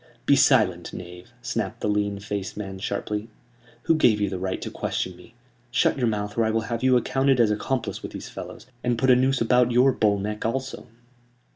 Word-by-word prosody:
"Be 140 - +5
silent, 110 - +3
knave!" 90 +3 -10
snapped 115 -6 -3
the - - -1
lean 105 -1 0
faced 100 -1 -5
man, 95 -2 -6
sharply. 105 +2 -3 0.5
"Who - - +3
gave 125 -9 +4
you 100 -1 0
the 95 - -3
right 95 0 -2
to - - -5
question 95 - -3
me? 115 +6 -17 0.3
Shut 120 - +2
your 125 -3 0
mouth, 105 -2 -2
or - - +4
I 110 - +1
will 110 0 +1
have 115 +1 -4
you 130 -1 +4
accounted 135 +2 +1
as 115 -3 +4
accomplice 125 +4 -2
with - - -7
these - - -7
fellows, - - -9 0.2
and 120 -1 +1
put 130 +3 +3
a - - +7
noose 130 +1 +2
about 125 +1 +3
your 125 +3 +5
bull 105 -4 +2
neck 105 +2 -4
also!" 130 +2 -3
110 Hz, 210 wpm, -25 LUFS, 100-125 Hz, 0.5 s, a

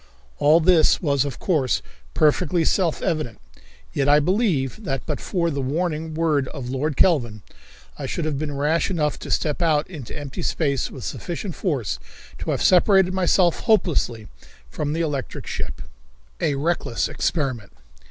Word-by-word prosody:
All 155 +3 +6
this 170 -1 +4
was, 140 -5 +1
of 140 - -5
course, 150 -9 0 0.3
perfectly 160 +2 +2
self 175 -5 +1
evident, 155 -9 -2 0.5
yet 140 0 +1
I 145 +1 +7
believe 180 - 0
that 135 -8 -2
but 150 -3 -3
for 170 -3 -1
the 140 -1 -2
warning 155 +3 -2
word 155 -5 +1
of 130 -3 -6
Lord 140 +2 -2
Kelvin, 120 - +2 0.6
I - - -4
should 165 - -2
have 150 -3 -1
been 145 -2 -3
rash 155 +6 +1
enough 150 -5 -1
to - - -8
step 150 +2 0
out 155 -3 +2
into 150 -10 -8
empty 145 -3 -6
space 140 -5 0
with 130 - -9
sufficient 175 +2 -4
force 130 - -2 0.4
to - - -4
have - - 0
separated 190 0 +5
myself 180 -2 +3
hopelessly 160 - +1 0.4
from 145 - -2
the 165 - -1
electrical 145 -6 -3
ship. - - -5 0.6
A 145 - +1
Reckless 150 -4 0
Experiment. 130 - -2
150 Hz, 155 wpm, -23 LUFS, 140-170 Hz, 0.6 s, I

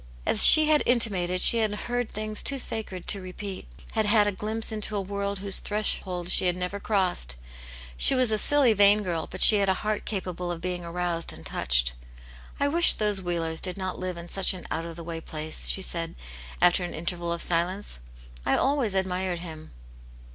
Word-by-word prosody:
As 215 - +6
she 310 -1 +10
had 305 -1 +2
intimated, 190 -7 0
she 235 - +7
had 215 -2 -1
heard 245 +2 -4
things 215 0 -2
too 275 - +2
sacred 215 -7 -3
to 200 - +1
repeat, 185 +1 -9 0.2
had 220 -2 -1
had 210 0 +3
a 205 - 0
glimpse 220 +3 -4
into 215 -1 -1
a 200 - -2
world 200 +1 -5
whose 195 0 +2
threshold 190 -4 -1
she 185 - +4
had 180 0 -1
never 180 +2 -5
crossed. 185 - -2 0.6
She - - +6
was 255 -3 +2
a 215 - +1
silly, 280 -4 +3
vain 205 +1 +3
girl, 170 -4 -4
but 185 - -2
she 215 - +8
had 200 -1 0
a 190 - +1
heart 215 -1 -3
capable 180 -3 -5
of 170 - -6
being 180 0 -5
aroused 170 0 -3
and - - -13
touched. - - -1 0.7
''I 285 - +1
wish 335 +4 +6
those 210 -2 -2
Wheelers 165 -2 -4
did 185 0 0
not 185 -1 -6
live 185 -1 -5
in 170 0 -10
such 195 +1 +1
an 180 - -11
out 165 +1 -4
of 165 - -10
the 170 - -10
way 165 0 -7
place," 155 0 -3
she 190 - 0
said, 165 -2 0 0.5
after 180 +1 +3
an 175 - -6
interval 170 +1 -5
of 170 - -3
silence. 175 - -3 0.4
I - - 0
always 265 -7 -1
admired 185 -1 -2
him." 155 -2 -11
190 Hz, 200 wpm, -25 LUFS, 175-210 Hz, 0.7 s, she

